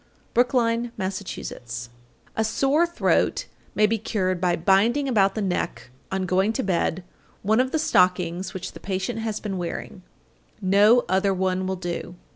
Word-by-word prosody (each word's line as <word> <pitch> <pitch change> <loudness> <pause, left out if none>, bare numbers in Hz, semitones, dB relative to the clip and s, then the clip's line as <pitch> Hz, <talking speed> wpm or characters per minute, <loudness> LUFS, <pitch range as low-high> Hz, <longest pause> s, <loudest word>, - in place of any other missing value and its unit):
Brookline, 240 -1 +2
Mass. 190 -1 -2
869. 120 -9 -7 0.4
A 220 - +1
sore 275 +9 +2
throat 345 - +1 0.3
may 215 - +5
be 220 +1 +1
cured 185 -4 -1
by 180 -2 +2
binding 210 - +3
about 200 -6 +3
the 215 - -1
neck 175 -9 -3 0.2
on 190 0 -1
going 190 +4 +2
to 265 - -1
bed 180 -1 0 0.4
one 215 +3 +3
of 255 +1 +2
the 315 - 0
stockings 180 - +2
which 185 - -5
the - - -11
patient 195 +4 -3
has 220 -1 -2
been 195 -3 -4
wearing 175 +2 -5 0.6
(no 205 +5 +5
other 190 +2 +2
one 185 0 0
will 190 - -1
do). 175 -1 -5
195 Hz, 160 wpm, -24 LUFS, 185-225 Hz, 0.6 s, may